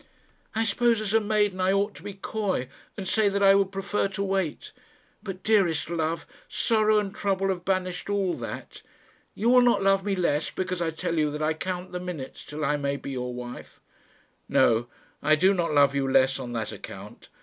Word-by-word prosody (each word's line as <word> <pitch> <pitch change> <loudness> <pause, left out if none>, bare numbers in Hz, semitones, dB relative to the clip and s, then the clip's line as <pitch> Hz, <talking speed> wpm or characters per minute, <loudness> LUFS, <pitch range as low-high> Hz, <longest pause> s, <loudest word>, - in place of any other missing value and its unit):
"I 225 - +2
suppose 230 +1 +2
as 215 -1 -2
a 225 - +6
maiden 205 -3 +1
I 185 +1 +3
ought 200 +1 +1
to - - -12
be 205 -1 -7
coy, 195 - -2 0.3
and 195 -2 -5
say 205 +2 +3
that 200 0 0
I 195 0 +8
would 195 -1 +2
prefer 200 +1 -1
to 195 0 -3
wait; 190 -5 -2 0.5
but, 195 -3 -7
dearest 175 -8 +2
love, 165 0 -1 0.2
sorrow 215 -1 +2
and 200 -2 -1
trouble 195 -2 0
have 180 -2 -2
banished 185 -1 -1
all 195 -3 +1
that. - - -7 0.5
You 230 +3 +2
will 250 0 +7
not 240 -5 +3
love 195 0 +3
me 200 -1 0
less 165 -5 0
because 185 -1 -3
I 165 - +1
tell 160 +1 -2
you 150 -1 +2
that 150 +1 -4
I 155 +1 +2
count 180 +2 -4
the 180 - -4
minutes 175 -7 -7
till 150 +1 -4
I 150 +1 +1
may 140 -1 -1
be 140 - -6
your 125 -1 -3
wife." 125 0 -8 0.7
"No; 115 +1 +3 0.3
I 155 - +4
do 185 +6 +4
not 175 -4 0
love 140 -2 +5
you 135 -1 0
less 135 +1 +4
on 125 -2 -6
that 110 -2 -3
account. - - -10
185 Hz, 205 wpm, -26 LUFS, 155-200 Hz, 0.7 s, I